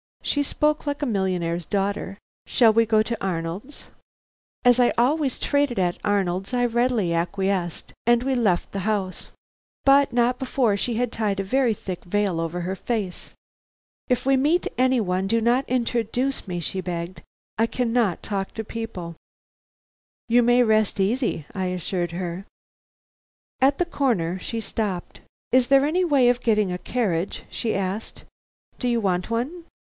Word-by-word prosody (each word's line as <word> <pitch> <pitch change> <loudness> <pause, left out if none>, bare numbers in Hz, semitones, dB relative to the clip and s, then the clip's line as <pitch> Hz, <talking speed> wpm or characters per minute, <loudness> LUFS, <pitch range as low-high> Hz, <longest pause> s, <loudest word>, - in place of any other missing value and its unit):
She 290 - +1
spoke 300 +2 0
like 285 0 -2
a - - +1
millionaire's 180 - -1
daughter. 195 -1 -2 0.3
"Shall 230 -4 +5
we 230 +1 +4
go 215 -1 +3
to 230 0 -4
Arnold's?" 185 - -4 0.8
As 245 0 +5
I 245 - +4
always 270 +3 +2
traded 285 -5 0
at 180 -2 0
Arnold's, 195 0 0
I 245 0 +2
readily 240 -6 +1
acquiesced, 180 0 -2
and 240 0 +4
we 265 +1 0
left 210 -8 +1
the 200 - -3
house. 200 -2 -2 0.6
But 275 -1 +5
not 245 +1 +2
before 245 -5 +1
she 235 +3 -2
had 245 0 0
tied 210 -4 -1
a - - 0
very 245 +3 +2
thick 185 -3 -6
veil 195 -2 0
over 165 +2 -2
her 185 +2 -3
face. 200 -3 -4 0.8
"If 250 0 +1
we 270 0 +4
meet 305 +7 +2
any 255 0 +3
one, 185 -1 -1
do 230 +3 +1
not 245 +4 +2
introduce 245 +1 -1
me," 175 -2 -3
she 185 +3 -3
begged. 175 -1 -5 0.4
"I 225 +1 +3
cannot 230 -6 0
talk 195 -2 -3
to 220 - -3
people." 195 -7 -6 1.1
"You 240 +1 +5
may 245 +1 +5
rest 215 -2 +2
easy," 205 - 0
I 190 -1 -2
assured 180 -1 -2
her. 175 +2 -4 1.1
At 275 +2 +4
the 355 - +2
corner 215 - 0
she 225 +4 -4
stopped. 200 -4 -4 0.3
"Is 255 -1 +4
there 275 +1 +5
any 355 +5 +1
way 275 -7 +4
of 245 0 +1
getting 215 -5 +2
a 180 - -2
carriage?" 195 -8 -2
she 230 - -2
asked. 195 +3 -4 0.6
"Do 250 - -1
you 240 -1 +2
want 180 -2 0
one?" 275 +10 -3
220 Hz, 160 wpm, -24 LUFS, 185-250 Hz, 1.1 s, Shall